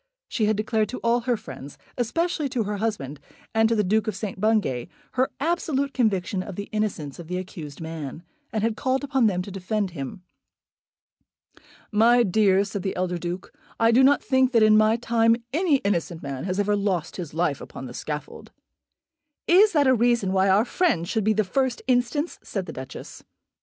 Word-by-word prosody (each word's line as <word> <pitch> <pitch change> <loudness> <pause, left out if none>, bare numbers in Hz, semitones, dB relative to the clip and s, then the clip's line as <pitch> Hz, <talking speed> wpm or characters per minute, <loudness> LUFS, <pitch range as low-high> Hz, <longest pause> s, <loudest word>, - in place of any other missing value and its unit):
She 220 - 0
had 215 0 +1
declared 215 0 0
to 255 - -5
all 235 +1 +3
her 240 0 0
friends, 135 -6 -10 0.2
especially 310 +5 -1
to 240 -3 -1
her 205 0 -3
husband 175 -11 -3 0.3
and 225 0 +3
to 230 - +2
the 210 - +2
Duke 215 +3 +1
of 215 - -1
St. 195 -1 -5
Bungay, 210 - +1 0.2
her 260 +1 +1
absolute 285 -3 0
conviction 195 -6 0
of 190 0 -7
the 200 +2 -6
innocence 190 -10 -3
of 170 - -9
the 180 +1 -3
accused 165 -6 -7
man, 160 -1 -6 0.3
and 215 -4 -1
had 225 -1 +1
called 260 +4 0
upon 265 -4 +2
them 180 -3 0
to 200 - -9
defend 195 +1 -2
him. 150 +3 -7 1.7
"My 235 +3 +5
dear," 200 -1 +3
said 200 0 -5
the 190 - -3
elder 180 -1 -1
Duke, 175 +2 -5 0.3
"I 230 0 +5
do 245 +3 +5
not 285 +2 +4
think 260 -1 +2
that 230 -2 +5
in 215 0 +6
my 215 +1 +5
time 230 -1 +3 0.2
any 330 -1 +3
innocent 170 -4 -1
man 135 0 -5
has 185 +1 -2
ever 205 0 +2
lost 190 -5 -1
his 170 -5 -6
life 160 -4 0
upon 130 - -8
the 125 - -8
scaffold." 150 +3 -6 1.0
"Is 395 +4 +6
that 295 -3 +4
a 260 - +5
reason 235 -5 +2
why 190 0 +3
our 200 +4 +4
friend 245 - +1
should 220 +2 0
be 215 +2 +3
the 215 +1 +2
first 260 +5 0
instance?" 255 +5 0
said 195 -3 -4
the 160 - -7
Duchess. 130 0 -9
215 Hz, 195 wpm, -25 LUFS, 180-240 Hz, 1.7 s, in